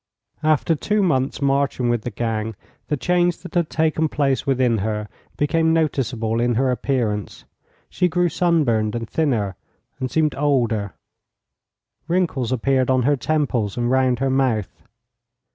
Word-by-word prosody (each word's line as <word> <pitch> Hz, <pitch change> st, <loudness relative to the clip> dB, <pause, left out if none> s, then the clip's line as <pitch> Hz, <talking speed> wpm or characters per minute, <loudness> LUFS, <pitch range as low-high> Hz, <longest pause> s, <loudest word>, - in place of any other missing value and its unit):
After 155 Hz, +1 st, +2 dB
two 210 Hz, +7 st, 0 dB
months' 135 Hz, -5 st, 0 dB
marching 140 Hz, -2 st, +1 dB
with 120 Hz, -1 st, +1 dB
the 120 Hz, -, -4 dB
gang, 110 Hz, -1 st, -3 dB, 0.3 s
the 150 Hz, -, -1 dB
change 175 Hz, +3 st, +1 dB
that 180 Hz, -, -9 dB
had 170 Hz, -3 st, +1 dB
taken 160 Hz, 0 st, +1 dB
place 140 Hz, -1 st, 0 dB
within 125 Hz, -4 st, +2 dB
her 105 Hz, +1 st, -2 dB, 0.3 s
became 160 Hz, +2 st, +2 dB
noticeable 120 Hz, -8 st, 0 dB
in 120 Hz, 0 st, +1 dB
her 130 Hz, +2 st, +2 dB
appearance. 115 Hz, -6 st, -2 dB, 0.4 s
She 180 Hz, -, 0 dB
grew 180 Hz, +1 st, +1 dB
sunburned 145 Hz, -12 st, +1 dB
and 115 Hz, -1 st, -4 dB
thinner, 110 Hz, -, -1 dB, 0.4 s
and 130 Hz, -, -2 dB
seemed 155 Hz, 0 st, +1 dB
older; 115 Hz, -, 0 dB, 1.1 s
wrinkles 165 Hz, -9 st, 0 dB
appeared 130 Hz, +1 st, +1 dB
on 130 Hz, -1 st, +3 dB
her 145 Hz, +3 st, +3 dB
temples 130 Hz, -8 st, -1 dB
and 120 Hz, 0 st, 0 dB
round 130 Hz, -1 st, +2 dB
her 135 Hz, +1 st, 0 dB
mouth. 125 Hz, -7 st, 0 dB
130 Hz, 145 wpm, -21 LUFS, 115-155 Hz, 1.1 s, on